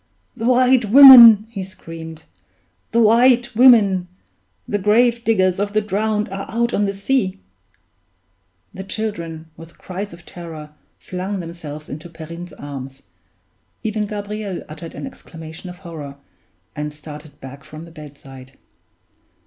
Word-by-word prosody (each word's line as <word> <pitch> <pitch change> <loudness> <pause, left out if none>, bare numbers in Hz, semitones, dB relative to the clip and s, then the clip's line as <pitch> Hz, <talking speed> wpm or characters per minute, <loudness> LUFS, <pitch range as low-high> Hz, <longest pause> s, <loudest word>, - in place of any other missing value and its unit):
"The 230 -1 -3
White 255 -1 +3
Women!" 235 -3 +10
he 200 -4 -5
screamed. 165 -3 -10 0.7
"The 230 0 +3
White 240 +2 +3
Women; 210 -7 +5 0.6
the 205 - -2
grave 235 +4 +2
diggers 190 -5 +1
of 205 0 -2
the 215 - +2
drowned 210 +1 -1
are 195 +1 -7
out 235 +1 -1
on 205 - +1
the 200 - -1
sea!" 200 -1 -1 1.4
The 190 - -7
children, 170 -6 -6
with 165 +1 -15
cries 195 +3 -7
of 170 0 -15
terror, 160 -4 -10 0.3
flung 190 +2 -5
themselves 160 -3 -9
into 155 +4 -9
Perrine's 170 +1 -10
arms; 135 -1 -9 0.8
even 215 -1 -2
Gabriel 205 -2 -6
uttered 160 +2 -10
an - - -7
exclamation 165 -8 -11
of 180 - -11
horror, 160 -6 -9 0.6
and 150 0 -4
started 150 -1 -12
back 135 +1 -11
from 155 +2 -11
the 170 - -15
bedside. 135 -4 -13
185 Hz, 135 wpm, -19 LUFS, 160-215 Hz, 1.4 s, Women